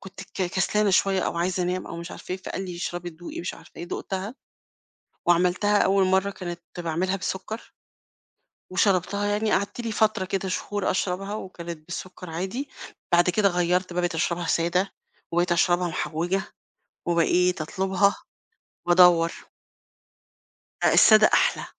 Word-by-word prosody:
كنت 190 Hz, -1 st, -11 dB
ك 195 Hz, 0 st, -5 dB
كسلانة 200 Hz, +3 st, +1 dB
شوية 190 Hz, 0 st, +3 dB
أو -, -, -2 dB
عايزة 180 Hz, +1 st, 0 dB
أنام 180 Hz, +1 st, -2 dB
أو 170 Hz, -, -7 dB
مش 170 Hz, 0 st, -7 dB
عارفة -, -, -7 dB
إيه، 185 Hz, -, -1 dB
فقال 190 Hz, -, -4 dB
لي: 180 Hz, -2 st, -6 dB
"اشربي، 175 Hz, 0 st, -4 dB
دوقي، 170 Hz, +2 st, -8 dB
مش 175 Hz, -, -4 dB
عارفة -, -, -16 dB
إيه." 170 Hz, -, -6 dB
دُقتها 195 Hz, +5 st, -4 dB, 0.9 s
وعملتها 180 Hz, +4 st, +3 dB
أول 195 Hz, 0 st, +3 dB
مرّة، 190 Hz, +1 st, +2 dB
كانت 175 Hz, -3 st, -6 dB, 0.2 s
باعملها 175 Hz, +3 st, -1 dB
بسكر 195 Hz, +4 st, -5 dB, 1.0 s
وشربتها 190 Hz, +1 st, +1 dB
يعني، 210 Hz, +1 st, 0 dB
قعدت 200 Hz, +4 st, -1 dB
لي 230 Hz, -2 st, -3 dB
فترة 215 Hz, -3 st, +2 dB
كده 190 Hz, 0 st, -2 dB
شهور 205 Hz, +1 st, -2 dB
أشربها 195 Hz, +2 st, -2 dB
وكانت 170 Hz, -5 st, -7 dB
بالسكر 180 Hz, 0 st, -7 dB
عادي، 190 Hz, -, -4 dB, 0.4 s
بعد 175 Hz, +1 st, +5 dB
كده 200 Hz, +2 st, +3 dB
غيرّت 180 Hz, 0 st, 0 dB
بقى 180 Hz, +1 st, -1 dB
بقيت 175 Hz, -1 st, -1 dB
أشربها 170 Hz, +1 st, -1 dB
سادة 175 Hz, +4 st, +1 dB, 0.4 s
وبقيت 175 Hz, +1 st, +2 dB
أشربها 175 Hz, +1 st, +2 dB
محوجة 175 Hz, +4 st, -1 dB, 0.6 s
وبقيت 175 Hz, +1 st, +2 dB
أطلبها 190 Hz, +4 st, +1 dB, 0.7 s
وأدوَّر. 175 Hz, -1 st, +6 dB, 1.5 s
آآ، -, -, +4 dB
السادة 215 Hz, -1 st, +7 dB
أحلى، -, -, +3 dB
185 Hz, 145 wpm, -25 LUFS, 175-195 Hz, 1.5 s, السادة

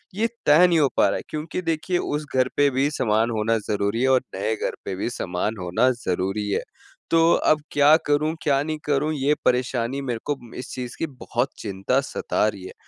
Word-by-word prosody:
ये 220 Hz, +3 st, +1 dB, 0.2 s
तय 155 Hz, +5 st, +7 dB
नहीं 170 Hz, -2 st, +3 dB
हो 145 Hz, -, +4 dB
पा -, -, +5 dB
रहा -, -, 0 dB
है, -, -, -7 dB
क्योंकि 155 Hz, +4 st, -4 dB
देखिए 165 Hz, +2 st, -1 dB
उस 150 Hz, -3 st, -2 dB
घर 130 Hz, 0 st, +3 dB
पे 145 Hz, 0 st, +5 dB
भी 135 Hz, +3 st, +1 dB
सामान 110 Hz, -4 st, +1 dB
होना 115 Hz, +1 st, +1 dB
ज़रूरी 105 Hz, +2 st, 0 dB
है -, -, +3 dB
और 130 Hz, -1 st, +4 dB
नए 110 Hz, +3 st, -1 dB
घर -, -, -3 dB
पे 95 Hz, -, -3 dB
भी 100 Hz, -, -2 dB
समान 105 Hz, 0 st, -3 dB
होना 100 Hz, +9 st, +2 dB
ज़रूरी 105 Hz, -3 st, -2 dB
है। -, -, 0 dB, 0.5 s
तो 165 Hz, 0 st, +5 dB
अब 155 Hz, -1 st, +2 dB
क्या 145 Hz, +1 st, +6 dB
करूँ, 150 Hz, +2 st, +1 dB
क्या 140 Hz, -2 st, +2 dB
नहीं 155 Hz, 0 st, -3 dB
करूँ 150 Hz, +2 st, +1 dB
ये 145 Hz, +1 st, +1 dB
परेशानी 125 Hz, +1 st, 0 dB
मेरे 125 Hz, -4 st, -3 dB
को 145 Hz, -1 st, -1 dB, 0.2 s
इस 125 Hz, -, -7 dB
चीज़ 125 Hz, -2 st, -6 dB
की 165 Hz, -, -1 dB
बहुत 130 Hz, -2 st, -3 dB
चिंता 100 Hz, +5 st, 0 dB
सता 130 Hz, -, -1 dB
रही 100 Hz, -3 st, -4 dB
है, -, -, -9 dB
130 Hz, 210 wpm, -23 LUFS, 110-150 Hz, 0.5 s, तय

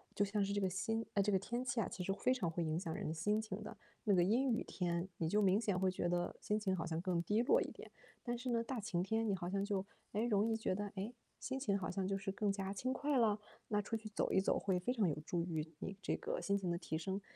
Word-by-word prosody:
就 205 Hz, -, +3 dB
像 205 Hz, 0 st, +1 dB
是 195 Hz, -, -1 dB
这 205 Hz, -, +1 dB
个 190 Hz, -2 st, +2 dB
心 225 Hz, +4 st, -1 dB
哎， 200 Hz, -, +4 dB
这 210 Hz, -, +2 dB
个 190 Hz, -, +4 dB
天 240 Hz, +5 st, -2 dB
气 245 Hz, -2 st, 0 dB
啊， 220 Hz, -, +1 dB
其 180 Hz, -, -5 dB
实 195 Hz, -, 0 dB
非 250 Hz, +6 st, +2 dB
常 225 Hz, -10 st, 0 dB
会 170 Hz, +1 st, -1 dB
影 155 Hz, 0 st, 0 dB
响 170 Hz, -3 st, -3 dB
人 -, -, -3 dB
的 155 Hz, -, -1 dB
心 210 Hz, +6 st, +1 dB
情 220 Hz, -, -5 dB
的。 -, -, -8 dB, 0.3 s
那 205 Hz, -, +4 dB
个 175 Hz, -, +5 dB
阴 245 Hz, +8 st, +3 dB
雨 225 Hz, -, +2 dB
天， 175 Hz, 0 st, -1 dB
你 160 Hz, -, 0 dB
就 210 Hz, +4 st, +3 dB
明 195 Hz, +1 st, +4 dB
显 200 Hz, -5 st, +1 dB
会 190 Hz, 0 st, +3 dB
觉 175 Hz, -1 st, -1 dB
得 175 Hz, 0 st, 0 dB
心 210 Hz, +1 st, +1 dB
情 190 Hz, -3 st, +1 dB
好 170 Hz, -2 st, -2 dB
像 160 Hz, -1 st, -1 dB
更 175 Hz, -1 st, +1 dB
低 210 Hz, +4 st, +2 dB
落 460 Hz, -, +5 dB
一 -, -, -2 dB
点， -, -, -10 dB, 0.3 s
但 240 Hz, -1 st, -1 dB
是 250 Hz, +1 st, -4 dB
呢 235 Hz, -1 st, +2 dB
大 245 Hz, +1 st, -3 dB
晴 185 Hz, -4 st, -1 dB
天 220 Hz, +2 st, +1 dB
你 200 Hz, -, +2 dB
好 175 Hz, -1 st, -3 dB
像 195 Hz, +1 st, 0 dB
就， 200 Hz, -2 st, 0 dB, 0.3 s
诶， 215 Hz, +3 st, +1 dB
容 215 Hz, -1 st, +3 dB
易 220 Hz, -, +2 dB
觉 220 Hz, -, 0 dB
得， 205 Hz, +1 st, -2 dB
诶， 200 Hz, +5 st, -3 dB, 0.3 s
心 265 Hz, -, -3 dB
情 200 Hz, -7 st, +1 dB
好 185 Hz, -, -2 dB
像 190 Hz, -2 st, -1 dB
就 195 Hz, 0 st, 0 dB
是 195 Hz, 0 st, -3 dB
更 200 Hz, 0 st, +1 dB
加 195 Hz, 0 st, -2 dB
轻 255 Hz, +6 st, -1 dB
快 280 Hz, +1 st, +1 dB
了， 215 Hz, -3 st, +3 dB, 0.3 s
那 210 Hz, -1 st, +2 dB
出 225 Hz, -, -2 dB
去 220 Hz, -1 st, -5 dB
走 -, -, 0 dB
一 190 Hz, -, +4 dB
走 -, -, +2 dB
会 190 Hz, -2 st, +1 dB
非 180 Hz, +7 st, 0 dB
常 220 Hz, -7 st, +3 dB
有 150 Hz, -2 st, -1 dB
助 170 Hz, -1 st, 0 dB
于 160 Hz, -2 st, -3 dB
你 195 Hz, -, -4 dB
这 -, -, 0 dB
个 -, -, -3 dB
心 200 Hz, 0 st, +2 dB
情 185 Hz, -3 st, -1 dB
的 170 Hz, -, 0 dB
提 165 Hz, -2 st, -3 dB
升。 190 Hz, +5 st, -2 dB
200 Hz, 320 characters per minute, -38 LUFS, 185-225 Hz, 0.3 s, 个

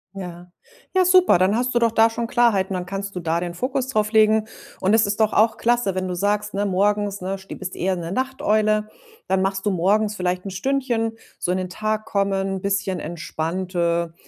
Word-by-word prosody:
Ja. 180 Hz, -2 st, -8 dB, 0.5 s
Ja, 370 Hz, -1 st, +4 dB
super, 365 Hz, -, +5 dB
dann 190 Hz, +4 st, +3 dB
hast 250 Hz, +1 st, 0 dB
du 240 Hz, -, +3 dB
doch 230 Hz, -1 st, +3 dB
da 225 Hz, 0 st, +5 dB
schon 230 Hz, +1 st, -3 dB
Klarheiten, 220 Hz, -6 st, +2 dB
dann 180 Hz, -1 st, -3 dB
kannst 195 Hz, +1 st, -5 dB
du -, -, -2 dB
da 165 Hz, -1 st, 0 dB
den 175 Hz, 0 st, -5 dB
Fokus 260 Hz, +4 st, -2 dB
drauflegen. 215 Hz, -2 st, +3 dB, 0.3 s
Und 190 Hz, +3 st, +2 dB
es 225 Hz, -2 st, +4 dB
ist 205 Hz, +2 st, -2 dB
doch 215 Hz, -1 st, +2 dB
auch 220 Hz, +1 st, +3 dB
klasse, 240 Hz, -5 st, +1 dB
wenn 185 Hz, 0 st, -2 dB
du 180 Hz, -, -3 dB
sagst: 205 Hz, +3 st, -1 dB
Ne, 200 Hz, +1 st, 0 dB
morgens, 205 Hz, +1 st, +1 dB
ne, 190 Hz, +2 st, -3 dB
st 195 Hz, -, -18 dB
du -, -, -4 dB
bist 185 Hz, -1 st, -6 dB
eher 190 Hz, +1 st, 0 dB
'ne 170 Hz, -1 st, -5 dB
Nachteule, 215 Hz, -4 st, 0 dB, 0.4 s
dann 190 Hz, 0 st, +1 dB
machst 195 Hz, +1 st, -1 dB
du 205 Hz, -, +2 dB
morgens 205 Hz, +4 st, +1 dB
vielleicht 180 Hz, -1 st, -2 dB
'n 195 Hz, -, -4 dB
Stündchen, 235 Hz, +1 st, -1 dB, 0.3 s
so 175 Hz, -, -1 dB
in 185 Hz, -, +1 dB
den 185 Hz, -1 st, -3 dB
Tag 215 Hz, +3 st, -2 dB
kommen, 195 Hz, -1 st, -1 dB
bisschen 195 Hz, -2 st, -1 dB
entspannte, 170 Hz, 0 st, -2 dB
200 Hz, 205 wpm, -22 LUFS, 185-220 Hz, 0.5 s, super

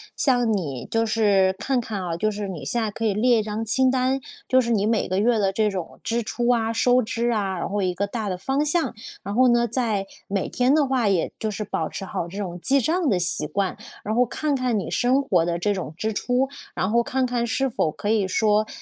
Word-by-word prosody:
像 245 Hz, -5 st, +2 dB
你 145 Hz, -, -3 dB
就 225 Hz, 0 st, 0 dB
是， 200 Hz, -4 st, +2 dB
看 260 Hz, +3 st, 0 dB
看 220 Hz, -4 st, -5 dB
啊 170 Hz, -2 st, -3 dB
就 215 Hz, +5 st, +1 dB
是 205 Hz, -1 st, -4 dB
你 175 Hz, -7 st, -6 dB
现 235 Hz, -, -1 dB
在 215 Hz, -, -2 dB
可 225 Hz, -, -6 dB
以 210 Hz, -, +2 dB
列 235 Hz, +2 st, +3 dB
一 -, -, -1 dB
张 215 Hz, +1 st, -4 dB
清 260 Hz, +4 st, +4 dB
单， 260 Hz, +1 st, +1 dB, 0.3 s
就 260 Hz, -1 st, +4 dB
是 235 Hz, -, -3 dB
你 210 Hz, -3 st, +2 dB
每 220 Hz, 0 st, +1 dB
个 185 Hz, -, -1 dB
月 225 Hz, +2 st, +2 dB
的 195 Hz, -2 st, +2 dB
这 210 Hz, +1 st, +1 dB
种 185 Hz, -4 st, -6 dB
支 235 Hz, +1 st, 0 dB
出 240 Hz, +2 st, -2 dB
啊、 225 Hz, -2 st, +2 dB
收 245 Hz, +2 st, +3 dB
支 235 Hz, +1 st, -1 dB
啊， 195 Hz, -4 st, -1 dB
然 -, -, -3 dB
后 205 Hz, +1 st, -2 dB
一 180 Hz, -2 st, -1 dB
个 200 Hz, -, 0 dB
大 210 Hz, 0 st, -4 dB
的 185 Hz, -, -3 dB
方 270 Hz, +9 st, 0 dB
向。 320 Hz, +3 st, 0 dB, 0.3 s
然 200 Hz, -, -4 dB
后 255 Hz, +4 st, +4 dB
呢， 240 Hz, -1 st, +3 dB
在 225 Hz, -4 st, -1 dB, 0.2 s
每 195 Hz, -1 st, -1 dB
天 255 Hz, +3 st, +2 dB
的 305 Hz, -2 st, +3 dB
话 255 Hz, -5 st, +1 dB
也 185 Hz, -4 st, 0 dB
就 220 Hz, -, -2 dB
是 210 Hz, 0 st, -4 dB
保 165 Hz, -6 st, -3 dB
持 195 Hz, -, -6 dB
好 175 Hz, -2 st, -4 dB
这 185 Hz, +4 st, -9 dB
种 180 Hz, -4 st, -4 dB
记 275 Hz, +7 st, +3 dB
账 325 Hz, +4 st, +1 dB
的 195 Hz, -, +2 dB
习 175 Hz, -3 st, +4 dB
惯， 190 Hz, +4 st, -1 dB, 0.3 s
然 215 Hz, -, -2 dB
后 245 Hz, -, +5 dB
看 300 Hz, +5 st, -2 dB
看 250 Hz, -4 st, 0 dB
你 195 Hz, -, -4 dB
生 255 Hz, +3 st, +2 dB
活 180 Hz, -10 st, +2 dB
的 170 Hz, 0 st, -1 dB
这 205 Hz, +4 st, 0 dB
种 185 Hz, -5 st, -5 dB
支 220 Hz, +4 st, -2 dB
出， 250 Hz, +5 st, 0 dB, 0.3 s
然 185 Hz, +3 st, -1 dB
后 235 Hz, +1 st, +4 dB
看 260 Hz, +2 st, -1 dB
看 240 Hz, -1 st, -1 dB
是 270 Hz, +4 st, 0 dB
否 215 Hz, -10 st, 0 dB
可 205 Hz, -, -5 dB
以 215 Hz, -3 st, +2 dB
说， 210 Hz, +2 st, +2 dB
220 Hz, 270 characters per minute, -23 LUFS, 195-245 Hz, 0.3 s, 后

